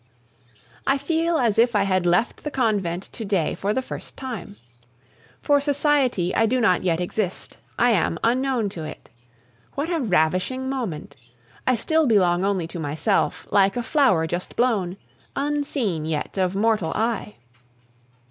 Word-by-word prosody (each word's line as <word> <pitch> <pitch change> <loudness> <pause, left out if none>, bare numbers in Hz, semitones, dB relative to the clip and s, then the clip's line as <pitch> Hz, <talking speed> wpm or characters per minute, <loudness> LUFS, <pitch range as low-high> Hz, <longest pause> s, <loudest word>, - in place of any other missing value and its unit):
I 275 - +3
feel 330 +3 0
as 230 -6 +2
if 235 0 +4
I 205 - +4
had 185 -2 +1
left 180 +7 +1
the 300 - -2
convent 205 - 0
to 230 - -7
day 195 -6 0
for 200 - -2
the 260 +5 -1
first - - -8
time. 225 -6 -7 0.9
For 290 -1 +4
society 280 - +2
I 225 - +3
do 255 +3 +1
not 215 -7 +3
yet 170 -2 0
exist; 180 +1 -3 0.2
I 245 +1 +4
am 175 -5 +1
unknown 250 -2 +1
to 170 -5 -7
it. 155 - -9 0.7
What 305 +5 -2
a 335 - +1
ravishing 185 - +1
moment! 235 - -4 0.5
I 255 - +4
still 315 +6 +2
belong 185 -5 +3
only 195 -4 0
to 170 - -6
myself, 160 +7 0
like 195 +2 +3
a 240 - -1
flower 240 - +3
just 175 +3 -4
blown, 205 -7 +1 0.4
unseen 275 - -1
yet 155 -2 -3
of 185 -1 0
mortal 210 -5 +1
eye. 220 -2 -1
215 Hz, 155 wpm, -23 LUFS, 180-260 Hz, 0.9 s, if